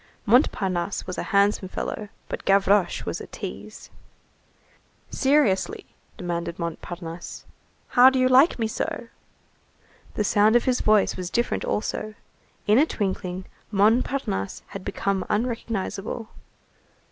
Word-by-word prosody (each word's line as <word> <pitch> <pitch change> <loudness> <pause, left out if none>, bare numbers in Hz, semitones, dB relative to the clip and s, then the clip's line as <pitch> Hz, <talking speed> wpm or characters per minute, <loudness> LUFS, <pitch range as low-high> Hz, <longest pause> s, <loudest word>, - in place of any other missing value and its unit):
Montparnasse 195 - +1
was 185 - -5
a - - -5
handsome 200 -1 +2
fellow, 205 +2 -5 0.2
but - - -5
Gavroche 195 0 +3
was - - -4
a - - -8
tease. - - -8 1.2
"Seriously," 270 -9 +2 0.3
demanded 170 -1 -3
Montparnasse, 170 0 -6 0.4
"how 250 +1 +7
do 265 - -1
you 255 0 +4
like 260 +6 +5
me 230 - 0
so?" 230 +1 -3 1.1
The 210 - +1
sound 210 +2 +4
of 240 - +5
his 255 -1 +1
voice 215 -2 +3
was 180 -1 -4
different 240 +4 -1
also. 215 0 -3 0.5
In 210 +4 +5
a 305 - +4
twinkling, 190 - -3 0.2
Montparnasse 210 - +1
had 195 - -7
become 195 -1 -1
unrecognizable. 225 -1 -2
205 Hz, 120 wpm, -25 LUFS, 185-235 Hz, 1.2 s, how